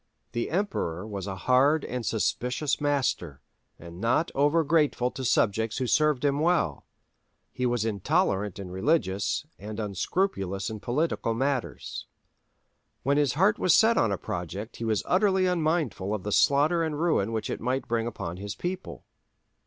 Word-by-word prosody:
The 120 - -2
Emperor 155 - -2
was 100 -3 -5
a 95 - -4
hard 130 - +3
and 125 0 -4
suspicious 125 +6 -1
master, 130 - 0 0.4
and 85 +2 -11
not 125 +8 +1
over 145 +4 +3
grateful 150 -5 +2
to 130 - -6
subjects 110 -2 +1
who 130 - -1
served 150 +1 +2
him 140 0 +2
well; 155 - +1 0.6
he 125 0 -1
was 120 -2 0
intolerant 105 - 0
in 95 -2 -7
religious, 100 - 0
and 105 +2 -7
unscrupulous 100 - -1
in 110 - -6
political 120 -2 -1
matters. 135 0 -3 1.0
When 140 +2 +2
his 145 -4 +2
heart 195 +6 +3
was 180 -2 +4
set 225 +1 +5
on 115 - +2
a 100 - 0
project 90 +6 -5
he 115 - -4
was 110 -3 0
utterly 190 0 +3
unmindful 155 - 0
of 100 - -6
the 105 - -3
slaughter 150 - +3
and 155 -2 -2
ruin 155 - +1
which 110 -1 -2
it - - -4
might 130 +3 -1
bring 115 0 0
upon 90 -6 -5
his 100 +2 -6
people. 180 +1 -5
125 Hz, 160 wpm, -27 LUFS, 100-155 Hz, 1.0 s, set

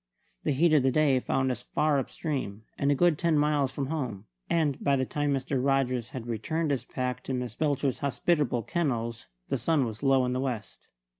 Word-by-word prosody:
The - - 0
heat 155 +4 +3
of 150 - +6
the 135 - +3
day 145 -2 +3
found 130 +1 0
us 120 -1 -4
far 150 +2 +1
up 135 - -4
stream, 130 - -4
and 140 0 +1
a - - +3
good 170 0 +3
ten 165 -3 +2
miles 145 -2 +2
from 140 0 -3
home; 130 -9 -4 0.2
and 155 -5 +1
by 140 - +3
the 130 -1 0
time 145 +2 -1
Mr. 135 -1 -1
Rogers 130 -4 +1
had 125 -3 -6
returned 150 +8 -1
his 130 -3 -1
pack 125 0 -3
to 130 - -2
Miss 125 -3 -3
Belcher's 140 -1 0
hospitable 140 -3 +1
kennels 115 - -2 0.2
the 135 - 0
sun 145 +2 +2
was 110 -1 -6
low 135 -2 +4
in 125 - -1
the 130 - -1
west. 120 -6 -4
135 Hz, 210 wpm, -28 LUFS, 125-150 Hz, 0.2 s, of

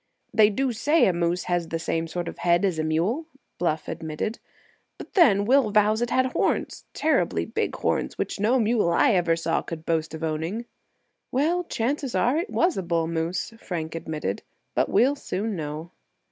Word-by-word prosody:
"They 215 -1 +6
do 260 +5 0
say 290 +8 +3
a 185 - +3
moose 170 +1 0
has 175 -2 -1
the 165 - -2
same 165 0 -2
sort 175 +1 -4
of - - -7
a - - -9
head 175 +2 +3
as 180 -5 0
a - - +1
mule," 180 - 0 0.3
Bluff 160 -3 -1
admitted; 165 +7 -4 0.6
"but - - -11
then 205 - +5
Will 260 -1 +4
vows 215 +2 +3
it 240 - 0
had 260 +1 +2
horns—terribly 315 - 0
big - - -2
horns—which - - -2
no 225 +6 +3
mule 220 -5 +2
I 170 +10 +4
ever 175 -4 +2
saw 165 0 0
could 160 -1 -7
boast 160 -1 -1
of 160 - -7
owning." 165 +9 -2 0.7
"Well, 335 +7 +1
chances 270 0 -2
are 250 +4 +2
it 345 +6 -2
was 350 0 +1
a - - 0
bull 170 -2 0
moose," 165 +5 -2
Frank 160 -6 -4
admitted; 155 -11 -4 0.3
"but - - +1
we'll 250 +8 +4
soon 215 -5 -3
know." 155 +1 -5
180 Hz, 180 wpm, -25 LUFS, 165-235 Hz, 0.7 s, They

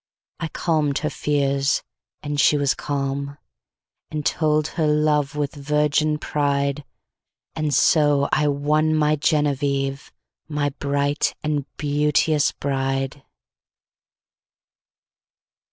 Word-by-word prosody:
I 165 - -2
calm'd 155 -4 0
her - - -1
fears, 140 -1 0 0.4
and 145 -1 -3
she 150 - +4
was 140 -2 +2
calm. 140 0 -3 0.7
And 150 -1 -4
told 155 -2 +1
her 160 -3 -1
love 150 -1 +1
with 145 -1 -2
virgin 150 +1 +1
pride; 140 -1 -1 0.7
And 155 -1 -1
so 145 0 +3
I 150 -1 +2
won 150 +2 +1
my 155 0 +3
Genevieve, 140 -2 0 0.4
My 150 -2 -1
bright 140 +1 -1
and 150 -2 -1
beauteous 150 +1 +2
Bride. 135 0 -2
145 Hz, 100 wpm, -22 LUFS, 140-150 Hz, 0.7 s, she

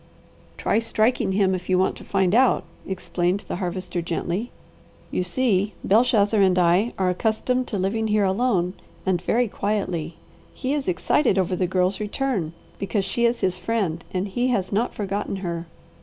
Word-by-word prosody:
"Try - - +1
striking 225 -2 +1
him 190 -1 +3
if 180 0 -4
you 185 - +4
want 185 - +2
to - - -11
find 190 -1 +1
out," 255 +2 +4 0.2
explained 185 0 -1
the - - -5
Harvester 180 -1 -3
gently. 175 +6 -2 0.6
"You - - 0
see, 200 0 +1
Belshazzar 215 -1 +4
and 185 -2 +4
I 180 +6 +3
are 185 -1 +2
accustomed 230 +6 0
to 210 - -3
living 210 +4 0
here 210 -1 +2
alone 190 -3 +1 0.3
and 185 -2 +1
very 240 +6 +1
quietly. 185 -6 -2 0.4
He 265 +1 -2
is 290 -2 -2
excited 190 - +2
over 185 -1 +1
the 180 0 0
Girl's 185 +1 +1
return, 210 - -2 0.3
because 195 0 -1
she 235 +3 0
is 235 0 -1
his 185 -1 0
friend, 180 -5 -1
and 185 +2 -1
he 245 +6 0
has 205 -7 0
not 220 +4 0
forgotten 200 -1 -2
her. 170 -3 -4
195 Hz, 170 wpm, -24 LUFS, 180-225 Hz, 0.6 s, you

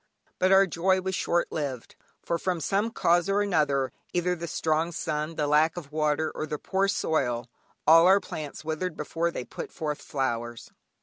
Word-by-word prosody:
But 185 +1 +3
our 195 0 +7
joy 190 +2 +1
was 190 0 -3
short 175 -1 0
lived, 135 -6 -4 0.3
for 170 - -1
from 180 -2 -1
some 200 +7 0
cause 175 -4 +2
or 200 +1 +2
another, 145 -8 +1 0.2
either 180 0 +1
the 170 0 -6
strong 160 +1 0
sun, 155 -1 -3
the 150 - 0
lack 155 +3 +3
of 150 -5 -7
water, 155 0 0
or 155 - -4
the 150 - -3
poor 190 +5 0
soil, 125 - 0 0.4
all 165 +2 +7
our 195 +2 +6
plants 155 -5 -7
withered 160 +2 -3
before 165 +3 -1
they 125 -7 -5
put - - -7
forth 150 -3 -4
flowers. 120 -4 -3
160 Hz, 180 wpm, -27 LUFS, 150-180 Hz, 0.4 s, our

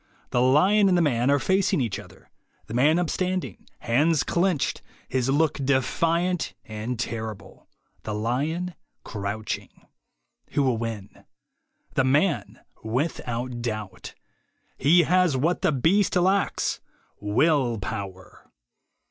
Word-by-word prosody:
The 120 - +2
lion 185 +11 +4
and 180 - +3
the - - +3
man 125 -4 +1
are 140 - +5
facing 190 +3 +1
each 115 -7 -2
other; - - -15 0.3
the - - -9
man 145 +7 +4
upstanding, 185 +1 -2
hands 145 +6 +2
clenched, 175 -4 0 0.3
his 130 0 -1
look 145 0 +1
defiant 165 +7 0
and 110 +3 -5
terrible; 110 -3 -6 0.3
the 105 - -4
lion 145 +11 -1 0.3
crouching. 105 +2 -4 0.8
Who 145 - +2
will 130 -4 +1
win? 110 -4 -6 0.7
The 135 - +2
man, 145 +8 +1 0.2
without 120 -1 -3
doubt. 110 -4 -5 0.6
He 170 +6 +5
has 180 -3 +3
what 165 +7 0
the - - +3
beast 170 +11 +2
lacks, 190 +2 +1 0.4
Will 120 +3 +2
Power. 95 -2 -7
135 Hz, 115 wpm, -25 LUFS, 115-170 Hz, 0.8 s, are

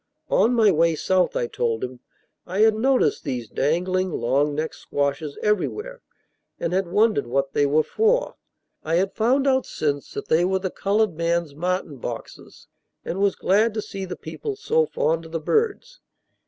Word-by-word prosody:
On 245 +2 +3
my 220 -3 +5
way 165 0 +3
South, 185 +3 +1
I - - 0
told 115 -1 -2
him, 125 0 -5 0.5
I 185 +4 -1
had 220 0 +6
noticed 255 +4 +2
these 125 -3 -3
dangling 180 - 0
long 140 +3 +1
necked 155 +1 -2
squashes 140 +1 -3
everywhere, 425 - -1 0.6
and 170 +1 -2
had 190 -1 +1
wondered 210 - +2
what 135 +2 -1
they 145 - +3
were 155 +2 +3
for. 455 - +1 0.5
I 160 +1 0
had 190 +3 +1
found 255 +5 +2
out 265 -2 +2
since 145 -2 -2
that - - -5
they 160 +2 +3
were 190 +1 +2
the 190 -1 -3
colored 205 -1 +1
man's 170 -1 -1
martin 175 -1 -2
boxes, - - -8 0.4
and 185 - -3
was 200 -1 +2
glad 210 +4 +2
to 215 - -1
see 195 -1 -6
the 180 - -6
people 425 -2 -6
so 460 +2 +1
fond 165 - -1
of - - -15
the 165 - -1
birds. 450 - -1
180 Hz, 175 wpm, -23 LUFS, 150-220 Hz, 0.6 s, had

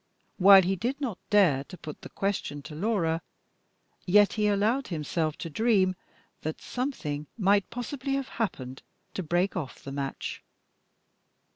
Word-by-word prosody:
While 195 0 +9
he 190 +2 +1
did 245 +9 -2
not 245 -10 -3
dare 180 -11 +4
to 185 - -11
put 150 -3 -9
the - - -9
question 190 -8 -2
to 150 - -9
Laura, 165 -2 0 0.9
yet 205 +2 +5
he 210 -1 +1
allowed 215 +7 +1
himself 155 -1 -2
to - - -5
dream 195 -1 +3 0.5
that 155 +1 -4
something 150 - -3
might 200 -1 +3
possibly 265 +3 -3
have 275 -1 -3
happened 130 - -3 0.3
to - - -3
break 175 +3 0
off 155 -8 -5
the 135 - -6
match. 135 -1 -4
190 Hz, 145 wpm, -28 LUFS, 155-220 Hz, 0.9 s, While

